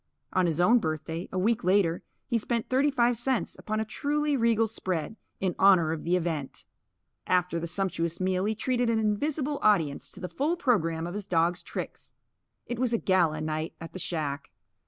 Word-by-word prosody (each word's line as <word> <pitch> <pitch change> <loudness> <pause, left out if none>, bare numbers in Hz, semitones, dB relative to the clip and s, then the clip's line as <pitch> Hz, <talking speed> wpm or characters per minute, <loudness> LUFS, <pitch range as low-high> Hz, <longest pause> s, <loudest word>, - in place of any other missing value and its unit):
On 185 -1 +3
his 165 -1 -1
own 225 +8 +5
birthday, 160 0 -4
a 185 - -3
week 215 +4 +1
later, 180 -2 +2 0.2
he 235 -3 0
spent 230 +1 -2
thirty 270 +3 +3
five 245 -4 +2
cents 255 -1 0
upon 215 0 -2
a 220 - -1
truly 295 +5 0
regal 230 -2 +3
spread, 185 -4 -3 0.2
in 185 -2 0
honour 185 -5 +5
of 160 -1 -4
the 175 +2 +2
event. 160 -6 -3 0.6
After 180 -2 +1
the 170 - -4
sumptuous 170 -2 -2
meal 185 0 0
he 220 +1 0
treated 245 +1 0
an 230 - +2
invisible 280 +7 0
audience 165 -10 +2
to - - -11
the 180 - -4
full 305 - -1
programme 165 - +1
of 175 - -5
his 205 -1 -5
dogs' 175 +1 +1
tricks. - - -7 0.5
It 240 -1 -4
was 250 -2 +1
a - - +4
gala 170 -7 +2
night 155 +1 -3
at 165 - -9
the 185 - -6
shack. 150 -5 -3
190 Hz, 190 wpm, -28 LUFS, 165-235 Hz, 0.6 s, own